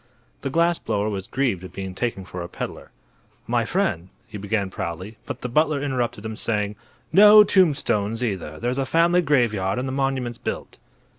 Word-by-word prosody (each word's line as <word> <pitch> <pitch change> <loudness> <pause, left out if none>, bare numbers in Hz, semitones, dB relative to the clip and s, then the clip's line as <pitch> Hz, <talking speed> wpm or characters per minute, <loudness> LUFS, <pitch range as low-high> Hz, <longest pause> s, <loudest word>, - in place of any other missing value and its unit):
The - - -2
glass 170 +1 +2
blower 105 +1 -1
was 95 -2 -4
grieved 120 -9 -1
at 95 - -10
being 95 -1 -5
taken 100 -2 -3
for 90 -1 -7
a 85 - -6
peddler. - - -7 0.6
"My - - 0
friend," 85 +3 -1 0.2
he 105 - -8
began, 100 -1 -1
proudly; 95 +3 -5
but - - -6
the - - -3
butler 150 +3 +2
interrupted 120 -6 -2
him, 110 0 -4
saying: 105 -2 -1 0.4
"No 210 +2 +9
tombstones, 125 - +2
either; 95 -9 -3
there's 125 +3 -1
a 135 - 0
family 170 +4 +3
graveyard 115 - +1
and 130 +1 -2
the - - -3
monument's 135 -3 -1
built." - - -5
115 Hz, 175 wpm, -23 LUFS, 100-140 Hz, 0.6 s, No